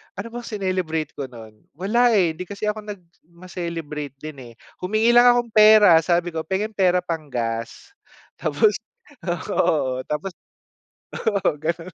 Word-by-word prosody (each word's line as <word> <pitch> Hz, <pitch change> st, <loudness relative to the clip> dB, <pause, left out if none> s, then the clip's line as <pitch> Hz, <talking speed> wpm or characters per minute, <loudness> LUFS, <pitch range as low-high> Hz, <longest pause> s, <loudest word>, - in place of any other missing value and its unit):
ano 200 Hz, +4 st, -6 dB
bang 240 Hz, 0 st, -7 dB
sinelebrate 185 Hz, -7 st, -2 dB
ko 140 Hz, -, -5 dB
nun, 110 Hz, -3 st, -13 dB, 0.2 s
wala 235 Hz, +7 st, +2 dB
eh 170 Hz, -5 st, +2 dB
hindi 185 Hz, -, -6 dB
kasi 205 Hz, +1 st, -5 dB
ako 210 Hz, 0 st, -2 dB
nag 205 Hz, -2 st, -7 dB, 0.3 s
ma-celebrate 170 Hz, -5 st, -6 dB
din 155 Hz, -3 st, -9 dB
eh. -, -, -17 dB, 0.3 s
Humingi 215 Hz, +5 st, +2 dB
lang 245 Hz, 0 st, +7 dB
akong 240 Hz, -1 st, +3 dB
pera, 210 Hz, -5 st, +8 dB
sabi 175 Hz, 0 st, +1 dB
ko, 160 Hz, -, -2 dB
"Penge 210 Hz, +3 st, -1 dB
pera 180 Hz, -2 st, +3 dB
pang-gas," 140 Hz, -, -5 dB, 0.4 s
tapos 435 Hz, -2 st, +1 dB, 0.8 s
oo, 130 Hz, -7 st, 0 dB
tapos. 150 Hz, +6 st, -3 dB, 0.8 s
Oo, 200 Hz, -7 st, 0 dB
gano'n. 165 Hz, +2 st, -3 dB
180 Hz, 140 wpm, -22 LUFS, 155-210 Hz, 0.8 s, pera